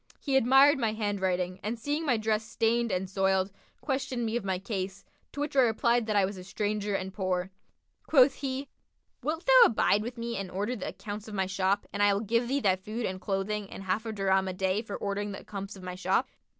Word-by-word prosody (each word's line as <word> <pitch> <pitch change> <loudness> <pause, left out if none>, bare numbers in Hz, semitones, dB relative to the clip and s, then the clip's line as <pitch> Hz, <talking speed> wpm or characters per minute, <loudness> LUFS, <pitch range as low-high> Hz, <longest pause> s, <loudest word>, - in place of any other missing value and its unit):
He 275 -2 -1
admired 270 +3 +6
my 225 -3 +1
handwriting 190 -4 -1
and 220 +3 -3
seeing 295 +7 -2
my 245 -4 +3
dress 215 0 0
stained 230 +1 0
and 185 +1 -1
soiled, 190 0 +1 0.3
questioned 265 -3 -2
me 225 +1 -2
of 240 - -1
my 190 -1 -1
case, 195 -1 -5 0.3
to - - -8
which 290 0 -2
I - - +5
replied 235 -1 +3
that 215 - 0
I 200 -2 +4
was 195 +1 -5
a 185 - -8
stranger 205 +1 -2
and 190 0 -3
poor. 185 -1 -1 0.6
Quoth 270 -2 +6
he, 270 0 -4 0.5
'Wilt 320 +3 -3
thou - - +8
abide 210 -2 +2
with 240 +3 -6
me 235 -1 -3
and 195 -1 -4
order 205 +7 -2
the 200 - -5
accounts 210 0 -7
of 215 - -7
my 190 -1 +1
shop 195 +1 0
and 205 - -2
I 205 -1 +5
will 200 - -1
give 230 +2 +1
thee 275 +3 +1
thy 190 -4 +3
food 215 +5 -4
and 185 0 -4
clothing 200 +1 -2
and 195 - -8
half 200 +4 -1
a - - -2
dirham 195 -2 +1
a 185 - -2
day 190 +2 0
for 215 -3 -6
ordering 205 0 -3
the - - -7
accompts 200 -1 -7
of 190 - -12
my 180 0 -5
shop?' 185 - +1
210 Hz, 230 wpm, -29 LUFS, 190-235 Hz, 0.6 s, thou